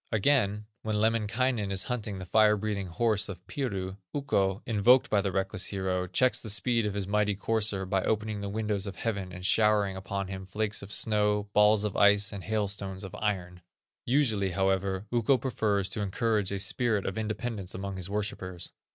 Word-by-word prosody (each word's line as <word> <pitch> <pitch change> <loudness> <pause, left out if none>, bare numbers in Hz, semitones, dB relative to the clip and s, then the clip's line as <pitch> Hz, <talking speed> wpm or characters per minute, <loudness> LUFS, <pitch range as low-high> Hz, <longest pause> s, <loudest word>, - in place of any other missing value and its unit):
Again, 105 -3 +2 0.2
when 110 -1 -2
Lemminkainen 115 0 +1
is 95 -1 +1
hunting 110 -5 -3
the 95 - -6
fire 105 +2 +4
breathing 100 -2 -3
horse 105 +4 +1
of 95 - -8
Piru, 100 -10 -3 0.2
Ukko, 100 -10 0
invoked 120 +4 +4
by 105 - +4
the 100 -1 -1
reckless 95 +1 -1
hero, 95 -2 -2
checks 130 +7 +2
the 110 - -6
speed 115 +2 +2
of 105 - -3
the 100 -1 -2
mighty 105 0 +1
courser 105 -2 -1
by 95 0 0
opening 110 -1 -1
the 100 - -4
windows 105 -1 -2
of 95 - -6
heaven, 100 -5 -3
and 90 0 -8
showering 105 -2 +3
upon 100 +1 -4
him 95 0 -7
flakes 105 +2 -1
of 100 - -9
snow, 105 -2 +1
balls 105 0 +5
of 105 -2 -2
ice, 100 +1 +4
and 100 -2 -7
hailstones 100 -2 -2
of 95 - -8
iron. 90 -4 -3 0.4
Usually, 120 -7 +2
however, 95 +1 0
Ukko 120 +2 +3
prefers 105 -7 0
to 105 - -4
encourage 105 0 0
a 100 - -1
spirit 105 +1 0
of 95 - -2
independence 110 -3 -3
among 95 0 -5
his 95 0 -5
worshipers. 100 -4 -4
105 Hz, 180 wpm, -29 LUFS, 95-110 Hz, 0.4 s, balls